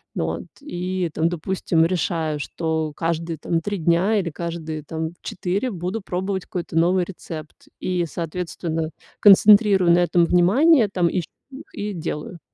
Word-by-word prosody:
Вот, -, -, -2 dB, 0.2 s
и 180 Hz, -, -3 dB
там, 160 Hz, +2 st, +1 dB
допустим, 170 Hz, -1 st, 0 dB
решаю, 165 Hz, -3 st, -1 dB
что 160 Hz, 0 st, -2 dB
каждые 165 Hz, 0 st, -2 dB
там 165 Hz, +2 st, -1 dB
3 205 Hz, +3 st, -3 dB
дня 175 Hz, +6 st, +2 dB
или 180 Hz, -3 st, -2 dB
каждые 160 Hz, -1 st, -5 dB
там 160 Hz, +2 st, -4 dB
4, 195 Hz, +8 st, -2 dB
буду 185 Hz, +4 st, -4 dB
пробовать 190 Hz, 0 st, -3 dB
какой-то 170 Hz, -2 st, -4 dB
новый 180 Hz, +2 st, +3 dB
рецепт. 165 Hz, -4 st, -9 dB, 0.2 s
И 180 Hz, -2 st, -1 dB
соответственно, 165 Hz, -1 st, -4 dB, 0.3 s
концентрирую 200 Hz, -2 st, +7 dB
на 170 Hz, -, +5 dB
этом 175 Hz, -1 st, +3 dB
внимание 215 Hz, -, +4 dB
там 180 Hz, -3 st, +1 dB
и 180 Hz, -, -1 dB
чт 155 Hz, -, -12 dB, 0.4 s
и 205 Hz, 0 st, -4 dB
делаю. 165 Hz, 0 st, -5 dB
175 Hz, 145 wpm, -22 LUFS, 165-190 Hz, 0.4 s, концентрирую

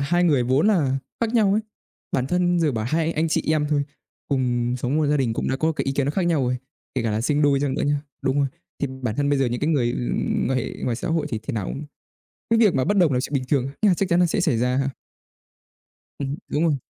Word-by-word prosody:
hai 175 Hz, +5 st, +2 dB
người 145 Hz, -7 st, +3 dB
vốn 130 Hz, -, +2 dB
là 145 Hz, -10 st, +2 dB, 0.2 s
khác 230 Hz, +1 st, 0 dB
nhau 205 Hz, -4 st, +4 dB
ấy. 215 Hz, -, +2 dB, 0.5 s
Bản 130 Hz, 0 st, +1 dB
thân 175 Hz, +1 st, +1 dB
giờ 155 Hz, -3 st, +2 dB
bảo 110 Hz, -2 st, -2 dB
hai 160 Hz, +2 st, +1 dB
anh 160 Hz, +1 st, 0 dB
chị -, -, +1 dB
em 150 Hz, -1 st, +1 dB
thôi, 145 Hz, -1 st, +2 dB, 0.5 s
cùng 125 Hz, -2 st, 0 dB
sống 130 Hz, +5 st, -1 dB
một 155 Hz, -2 st, +2 dB
gia 150 Hz, +1 st, +2 dB
đình 125 Hz, -5 st, +1 dB
cũng -, -, -2 dB
đã 130 Hz, -, 0 dB
có 160 Hz, +3 st, +1 dB
cái -, -, -3 dB
ý 135 Hz, -, 0 dB
kiến 140 Hz, -1 st, 0 dB
nó 145 Hz, -, 0 dB
khác 190 Hz, -, -1 dB
nhau 165 Hz, -5 st, +2 dB
rồi, 125 Hz, +1 st, 0 dB, 0.4 s
kể 130 Hz, -, 0 dB
cả 115 Hz, -, 0 dB
là 105 Hz, +1 st, 0 dB
sinh 150 Hz, +4 st, +1 dB
đôi 140 Hz, -1 st, +3 dB
chăng 140 Hz, -2 st, 0 dB
nữa -, -, -1 dB
nhá. 145 Hz, 0 st, +1 dB, 0.2 s
Đúng 135 Hz, +1 st, +1 dB
rồi. 140 Hz, -, +3 dB, 0.3 s
Thì -, -, 0 dB, 0.2 s
bản 110 Hz, -3 st, -2 dB
thân 145 Hz, 0 st, +1 dB
bây 145 Hz, -1 st, +2 dB
giờ 135 Hz, -, +2 dB
những 120 Hz, 0 st, -2 dB
cái 150 Hz, -, 0 dB
người, 120 Hz, -6 st, +1 dB
ừm, 120 Hz, -, -1 dB
quan 130 Hz, -, +1 dB
hệ 125 Hz, -, -3 dB
ngoài 120 Hz, -2 st, 0 dB
xã 180 Hz, -, -4 dB
hội 160 Hz, -2 st, 0 dB
thì 110 Hz, -, -2 dB
thế -, -, -4 dB
nào 105 Hz, -4 st, -2 dB
cũng 145 Hz, -, -5 dB, 0.7 s
cái 230 Hz, 0 st, +4 dB
việc 210 Hz, -6 st, +4 dB
mà 130 Hz, -, +2 dB
bất 205 Hz, +9 st, +1 dB
đồng 170 Hz, -7 st, +4 dB
là 125 Hz, -, +2 dB
chuyện 135 Hz, -, -4 dB
bình 135 Hz, -2 st, +1 dB
thường, 135 Hz, -3 st, +2 dB
nó 205 Hz, -4 st, +5 dB
chắc 190 Hz, +2 st, -1 dB
chắn 170 Hz, -, +3 dB
nó 180 Hz, -, +5 dB
sẽ 165 Hz, -, 0 dB
xảy 130 Hz, -8 st, +2 dB
ra 125 Hz, +2 st, +1 dB
ha. 135 Hz, 0 st, +1 dB, 1.3 s
Ừm, 140 Hz, 0 st, -3 dB
đúng 150 Hz, -, 0 dB
rồi. 160 Hz, -3 st, +3 dB
145 Hz, 280 wpm, -23 LUFS, 130-165 Hz, 1.3 s, nó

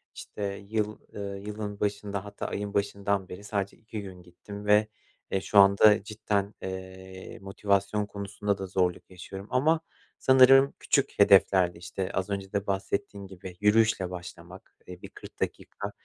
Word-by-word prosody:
işte, 105 Hz, -, -8 dB, 0.3 s
yıl, 105 Hz, -1 st, -1 dB
eee, 100 Hz, -1 st, -5 dB
yılın 105 Hz, -1 st, -5 dB
başında 100 Hz, -1 st, -2 dB
hatta 100 Hz, 0 st, -7 dB
ayın 100 Hz, 0 st, -4 dB
başından 100 Hz, -1 st, -1 dB
beri 90 Hz, +3 st, -9 dB
sadece 100 Hz, -1 st, -3 dB
2 110 Hz, -1 st, -7 dB
gün 95 Hz, -3 st, -10 dB
gittim 100 Hz, +4 st, -10 dB
ve 105 Hz, +1 st, +4 dB, 0.4 s
e, 95 Hz, -, 0 dB
şu 105 Hz, -, -1 dB
anda 100 Hz, +1 st, +6 dB
cidden, 105 Hz, -1 st, -2 dB
eee, 95 Hz, 0 st, -8 dB
motivasyon 100 Hz, +1 st, 0 dB
konusunda 100 Hz, 0 st, -3 dB
da 95 Hz, -1 st, -5 dB
zorluk 90 Hz, -2 st, -1 dB
yaşıyorum. 95 Hz, +2 st, -9 dB
Ama 155 Hz, +6 st, +3 dB, 0.4 s
sanırım 135 Hz, +1 st, +6 dB
küçük 140 Hz, -, 0 dB
hedeflerle, 95 Hz, -3 st, +5 dB
işte, 90 Hz, +2 st, -4 dB
az 95 Hz, +1 st, -2 dB
önce 100 Hz, -1 st, -4 dB
de 100 Hz, 0 st, -1 dB
bahsettiğin 100 Hz, 0 st, -3 dB
gibi, 95 Hz, -1 st, -10 dB
yürüyüşle 105 Hz, -3 st, +3 dB
başlamak, 90 Hz, +2 st, -10 dB
eee, 90 Hz, -1 st, -10 dB
bir -, -, -9 dB
40 -, -, -13 dB
dakika, -, -, -4 dB
100 Hz, 150 wpm, -28 LUFS, 95-105 Hz, 0.4 s, anda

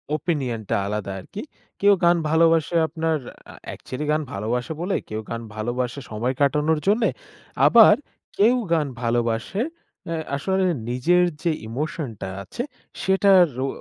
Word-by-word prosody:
ওপিনিয়নটা 135 Hz, -, -2 dB
আলাদা 105 Hz, -1 st, -3 dB
আরকি। 195 Hz, -, -8 dB, 0.4 s
কেউ 200 Hz, 0 st, +6 dB
গান 170 Hz, 0 st, +5 dB
ভালোবাসে 165 Hz, +1 st, +3 dB
আপনার 160 Hz, 0 st, -1 dB, 0.3 s
আ -, -, -13 dB
অ্যাকচেলি 135 Hz, +4 st, -6 dB
গান 155 Hz, +1 st, +1 dB
ভালোবাসে 115 Hz, +7 st, -2 dB
বলে 185 Hz, +3 st, -1 dB
কেউ 110 Hz, 0 st, -3 dB
গান 115 Hz, 0 st, -4 dB
ভালোবাসে 120 Hz, +4 st, -2 dB
সময় 115 Hz, +4 st, -1 dB
কাটানোর 150 Hz, +2 st, +2 dB
জন্যে, 220 Hz, +3 st, +3 dB, 0.6 s
আবার 225 Hz, -3 st, +8 dB, 0.4 s
কেউ 225 Hz, +5 st, +5 dB, 0.2 s
গান 155 Hz, -3 st, +2 dB
ভালোবাসে 120 Hz, -, -1 dB, 0.5 s
আ -, -, 0 dB, 0.2 s
আসলে 190 Hz, +7 st, 0 dB, 0.3 s
নিজের 165 Hz, +9 st, +3 dB, 0.2 s
যে 170 Hz, -, +2 dB, 0.2 s
ইমোশনটা 130 Hz, -, -4 dB, 0.2 s
আছে 240 Hz, -, -5 dB, 0.4 s
সেটার 190 Hz, -1 st, +5 dB, 0.2 s
ও -, -, -1 dB
150 Hz, 130 wpm, -23 LUFS, 120-175 Hz, 0.6 s, আবার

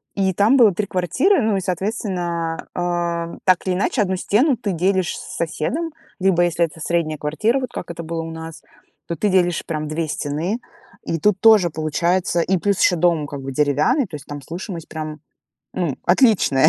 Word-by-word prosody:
и 190 Hz, -1 st, +1 dB
там 210 Hz, +9 st, +4 dB
было 225 Hz, -6 st, +6 dB
3 205 Hz, +3 st, -2 dB
квартиры. 265 Hz, -, +2 dB
Ну 215 Hz, -3 st, +1 dB
и, -, -, -1 dB
соответственно, 180 Hz, -3 st, -2 dB, 0.2 s
э, 170 Hz, -1 st, -2 dB
так 185 Hz, -2 st, +3 dB
или 185 Hz, -, +1 dB
иначе 205 Hz, +4 st, 0 dB
одну 190 Hz, -2 st, 0 dB
стену 240 Hz, -, +2 dB
ты 215 Hz, -3 st, -2 dB
делишь 185 Hz, +1 st, +1 dB
с -, -, -8 dB
соседом, 275 Hz, -, -2 dB, 0.3 s
либо, 185 Hz, -2 st, +3 dB
если 170 Hz, 0 st, +2 dB
это 160 Hz, 0 st, -11 dB
средняя 160 Hz, -1 st, -1 dB
квартира, 215 Hz, -, 0 dB
вот 255 Hz, -, -4 dB
как -, -, -6 dB
это 170 Hz, 0 st, -7 dB
было 165 Hz, 0 st, -3 dB
у 165 Hz, -, -6 dB
нас, 160 Hz, -1 st, -8 dB, 0.5 s
то 170 Hz, -, -3 dB
ты 205 Hz, +4 st, 0 dB
делишь 175 Hz, -2 st, +2 dB
прям 155 Hz, -2 st, -3 dB
2 155 Hz, +2 st, -2 dB
стены. 155 Hz, +9 st, -2 dB, 0.4 s
И 165 Hz, -, -2 dB
тут 205 Hz, +2 st, +2 dB
тоже 215 Hz, -5 st, +6 dB
получается 170 Hz, +3 st, 0 dB
и 190 Hz, +3 st, +1 dB
плюс 200 Hz, +2 st, 0 dB
еще 180 Hz, -, +4 dB
дом 165 Hz, -3 st, +2 dB
как 140 Hz, -1 st, -7 dB
бы 135 Hz, -, -5 dB
деревянный, 150 Hz, -, +2 dB
то 165 Hz, -, -8 dB
есть 145 Hz, -, -9 dB
там 145 Hz, -1 st, -6 dB
слышимость 170 Hz, -, -7 dB
прям, 155 Hz, -1 st, -6 dB, 0.5 s
ну, 170 Hz, -7 st, -2 dB
отличная. 175 Hz, -, +4 dB
175 Hz, 190 wpm, -21 LUFS, 160-200 Hz, 0.5 s, было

